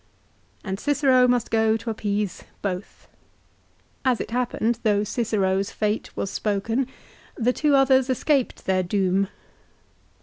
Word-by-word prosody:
And 190 Hz, -1 st, -4 dB
Cicero 270 Hz, -3 st, +3 dB
must 245 Hz, -2 st, +1 dB
go 220 Hz, 0 st, +3 dB
to 230 Hz, -, -6 dB
appease 205 Hz, -2 st, -2 dB, 0.2 s
both. 185 Hz, -1 st, -5 dB, 1.0 s
As 255 Hz, -3 st, +2 dB
it -, -, -5 dB
happened, 235 Hz, -1 st, 0 dB
though 210 Hz, -3 st, +2 dB
Cicero's 200 Hz, -4 st, 0 dB
fate 210 Hz, 0 st, -2 dB
was 195 Hz, -, -2 dB
spoken, 225 Hz, +5 st, -1 dB, 0.5 s
the 245 Hz, +2 st, +2 dB
two 295 Hz, 0 st, +2 dB
others 265 Hz, -1 st, +4 dB
escaped 260 Hz, +1 st, 0 dB
their 190 Hz, -1 st, +2 dB
doom. 190 Hz, +1 st, +1 dB
220 Hz, 125 wpm, -24 LUFS, 200-250 Hz, 1.0 s, others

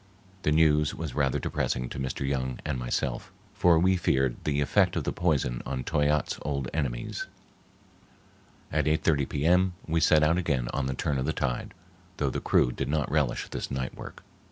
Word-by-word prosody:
The 75 Hz, -, +1 dB
news 75 Hz, -1 st, +3 dB
was 80 Hz, -5 st, -5 dB
rather 70 Hz, -3 st, +1 dB
depressing 60 Hz, 0 st, -1 dB
to -, -, -6 dB
Mr. 65 Hz, +1 st, -3 dB
Young 65 Hz, -2 st, -1 dB
and 70 Hz, -4 st, -2 dB
myself, -, -, -2 dB, 0.2 s
for 90 Hz, -5 st, +4 dB
we 95 Hz, +3 st, +3 dB
feared 65 Hz, -7 st, +1 dB
the 75 Hz, -1 st, +1 dB
effect 70 Hz, -, +2 dB
of -, -, -1 dB
the -, -, -2 dB
poison 70 Hz, -8 st, 0 dB
on 65 Hz, 0 st, -3 dB
Toyatte's 75 Hz, +2 st, 0 dB
old 70 Hz, -2 st, -2 dB
enemies. 65 Hz, -6 st, -3 dB, 1.4 s
At -, -, +1 dB
8.30 75 Hz, -2 st, +1 dB
P.M. 90 Hz, +5 st, +2 dB
we 80 Hz, 0 st, +1 dB
set 80 Hz, -1 st, +5 dB
out 80 Hz, +3 st, +3 dB
again 70 Hz, -9 st, -1 dB
on 70 Hz, -2 st, -1 dB
the 65 Hz, -, -2 dB
turn 70 Hz, +1 st, -1 dB
of 65 Hz, -, -1 dB
the 80 Hz, -, 0 dB
tide, 65 Hz, +2 st, -3 dB, 0.4 s
though 70 Hz, -3 st, 0 dB
the -, -, -3 dB
crew 60 Hz, -, +3 dB
did -, -, -3 dB
not 75 Hz, -2 st, 0 dB
relish 75 Hz, -6 st, 0 dB
this -, -, -4 dB
night 65 Hz, -1 st, -3 dB
work. -, -, -10 dB
70 Hz, 180 wpm, -28 LUFS, 65-80 Hz, 1.4 s, set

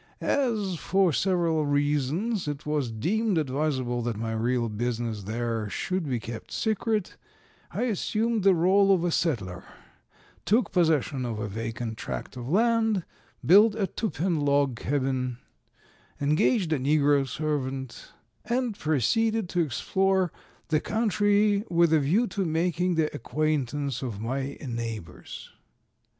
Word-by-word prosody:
As, 215 Hz, -9 st, 0 dB
for 185 Hz, +3 st, +2 dB
several 170 Hz, -4 st, +1 dB
reasons, 145 Hz, -, 0 dB
it 145 Hz, 0 st, -4 dB
was 150 Hz, -4 st, -1 dB
deemed 195 Hz, -, 0 dB
advisable 130 Hz, -4 st, -1 dB
that 115 Hz, -2 st, -2 dB
my 115 Hz, +1 st, -3 dB
real 120 Hz, +2 st, 0 dB
business 115 Hz, -1 st, -3 dB
there 115 Hz, 0 st, -2 dB
should 180 Hz, -, -2 dB
be 125 Hz, -2 st, 0 dB
kept 115 Hz, 0 st, -8 dB
secret, 220 Hz, -2 st, -1 dB, 0.5 s
I -, -, -2 dB
assumed 225 Hz, 0 st, 0 dB
the 195 Hz, -1 st, +6 dB
rôle 195 Hz, +4 st, +4 dB
of 185 Hz, -3 st, +3 dB
a 175 Hz, -, +1 dB
settler, 100 Hz, -, -1 dB, 0.8 s
took 225 Hz, +5 st, +2 dB
possession 155 Hz, -7 st, +1 dB
of 115 Hz, -3 st, -3 dB
a 105 Hz, -1 st, -3 dB
vacant 115 Hz, +2 st, -5 dB
tract -, -, -5 dB
of 125 Hz, 0 st, -6 dB
land, 225 Hz, 0 st, +2 dB, 0.4 s
built 205 Hz, +4 st, +6 dB
a 210 Hz, -3 st, 0 dB
two 215 Hz, +4 st, -3 dB
pen 170 Hz, -2 st, -1 dB
log 140 Hz, -4 st, +1 dB
cabin, 130 Hz, -3 st, -1 dB, 0.8 s
engaged 160 Hz, -, +2 dB
a 150 Hz, -, 0 dB
negro 145 Hz, 0 st, +3 dB
servant, 135 Hz, -2 st, -4 dB, 0.3 s
and 240 Hz, -2 st, -1 dB
proceeded 215 Hz, -, +1 dB
to 175 Hz, -, -1 dB
explore 190 Hz, +5 st, +1 dB, 0.4 s
the 155 Hz, -1 st, +3 dB
country 205 Hz, 0 st, +2 dB
with 170 Hz, -1 st, +3 dB
a 160 Hz, -, +5 dB
view 175 Hz, -, +2 dB
to 200 Hz, -4 st, -2 dB
making 175 Hz, +1 st, 0 dB
the 155 Hz, -2 st, 0 dB
acquaintance 145 Hz, -3 st, -1 dB
of 115 Hz, -6 st, -4 dB
my 135 Hz, +5 st, -3 dB
neighbors. 115 Hz, -7 st, -6 dB
155 Hz, 135 wpm, -27 LUFS, 125-195 Hz, 0.8 s, the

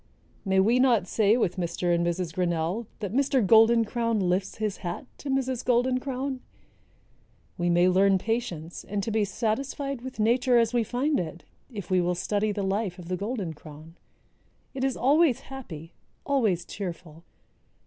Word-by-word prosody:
May 190 Hz, -1 st, +2 dB
we 225 Hz, +6 st, +4 dB
not 245 Hz, -7 st, +4 dB
say 210 Hz, +4 st, +3 dB
with 195 Hz, -6 st, 0 dB
Mr. 175 Hz, 0 st, -1 dB
and 170 Hz, 0 st, +1 dB
Mrs. 175 Hz, -1 st, -2 dB
Grinnell 175 Hz, +5 st, -1 dB
that 205 Hz, -1 st, -4 dB
Mr. 270 Hz, -3 st, +2 dB
Golden 225 Hz, +3 st, +6 dB
crown 230 Hz, -1 st, -1 dB
lifts 190 Hz, +1 st, 0 dB
his 215 Hz, -2 st, -2 dB
hat 175 Hz, +5 st, -5 dB
to 285 Hz, -, -6 dB
Mrs. 260 Hz, -2 st, -1 dB
Golden 250 Hz, +1 st, +2 dB
crown? 265 Hz, 0 st, -3 dB, 1.2 s
We 175 Hz, 0 st, -1 dB
may 175 Hz, +1 st, +4 dB
learn 190 Hz, +1 st, +4 dB
patience 190 Hz, -6 st, -3 dB
and 200 Hz, 0 st, -3 dB
to 225 Hz, -, -2 dB
be 215 Hz, 0 st, +2 dB
satisfied 255 Hz, +6 st, -2 dB
with 260 Hz, -2 st, -8 dB
nature 245 Hz, +3 st, +3 dB
as 230 Hz, 0 st, +2 dB
we 240 Hz, -1 st, +2 dB
find 265 Hz, +7 st, 0 dB
it, 170 Hz, -1 st, -5 dB, 0.3 s
if 200 Hz, -4 st, -7 dB
we 185 Hz, -1 st, +4 dB
will 175 Hz, 0 st, 0 dB
study 205 Hz, +3 st, 0 dB
the 205 Hz, -1 st, -3 dB
life 195 Hz, -1 st, -1 dB
of 175 Hz, -1 st, -10 dB
the 185 Hz, -, 0 dB
Golden 200 Hz, -3 st, -3 dB
crown. 155 Hz, +2 st, -13 dB, 0.8 s
It 265 Hz, -1 st, -4 dB
is 270 Hz, -1 st, 0 dB
always 290 Hz, 0 st, +3 dB
happy, 175 Hz, -, -9 dB, 0.3 s
always 215 Hz, -, +1 dB
cheerful. 170 Hz, -4 st, -7 dB
210 Hz, 170 wpm, -27 LUFS, 180-245 Hz, 1.2 s, Golden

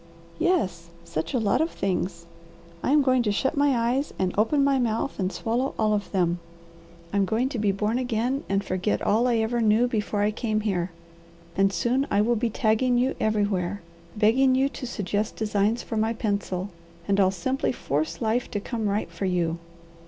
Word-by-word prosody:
"Yes, 185 Hz, -, 0 dB
such 160 Hz, -1 st, -4 dB
a -, -, +3 dB
lot 215 Hz, +5 st, +2 dB
of 325 Hz, -, +1 dB
things! 180 Hz, -, -2 dB, 0.6 s
I -, -, -1 dB
am 295 Hz, -1 st, +5 dB
going 255 Hz, -1 st, +3 dB
to 215 Hz, -3 st, +1 dB
shut 240 Hz, +6 st, 0 dB
my 285 Hz, -3 st, +3 dB
eyes 275 Hz, +3 st, -2 dB
and 185 Hz, -1 st, 0 dB
open 250 Hz, +7 st, +3 dB
my 275 Hz, -1 st, +3 dB
mouth 230 Hz, +1 st, -1 dB
and 185 Hz, -1 st, 0 dB
swallow 240 Hz, +6 st, -1 dB
all 215 Hz, -1 st, +2 dB
of 205 Hz, -1 st, -2 dB
them. 175 Hz, -3 st, +1 dB, 0.7 s
I'm 200 Hz, -1 st, +3 dB
going 225 Hz, +6 st, 0 dB
to 250 Hz, -, -3 dB
be 210 Hz, -1 st, +2 dB
born 210 Hz, +5 st, 0 dB
again 250 Hz, +2 st, -1 dB
and 195 Hz, 0 st, +1 dB
forget 185 Hz, +2 st, -1 dB
all 230 Hz, +4 st, +3 dB
I 240 Hz, -, +2 dB
ever 225 Hz, +2 st, 0 dB
knew 220 Hz, +2 st, +4 dB
before 210 Hz, -3 st, -1 dB
I 210 Hz, -, +2 dB
came 215 Hz, -1 st, -1 dB
here, 190 Hz, -4 st, -1 dB, 0.7 s
and 195 Hz, 0 st, +3 dB
soon 255 Hz, +7 st, 0 dB
I 200 Hz, -, +2 dB
will 235 Hz, +3 st, +3 dB
be 230 Hz, +1 st, 0 dB
tagging 225 Hz, +3 st, +2 dB
you 255 Hz, +2 st, +2 dB
everywhere, 205 Hz, -3 st, 0 dB, 0.3 s
begging 255 Hz, +5 st, +4 dB
you 270 Hz, +1 st, +2 dB
to 265 Hz, -2 st, -7 dB
suggest 210 Hz, -2 st, -2 dB
designs 215 Hz, +1 st, 0 dB
for 225 Hz, -, -4 dB
my 220 Hz, +1 st, +1 dB
pencil, 200 Hz, -3 st, -2 dB, 0.4 s
and 200 Hz, 0 st, +2 dB
I'll 190 Hz, -1 st, +5 dB
simply 255 Hz, +9 st, -1 dB
force 155 Hz, -, -2 dB
life 225 Hz, +3 st, 0 dB
to 205 Hz, -, -2 dB
come 220 Hz, 0 st, -2 dB
right 205 Hz, +2 st, -1 dB
for 195 Hz, -, -4 dB
you." 170 Hz, -3 st, 0 dB
215 Hz, 190 wpm, -25 LUFS, 195-245 Hz, 0.7 s, am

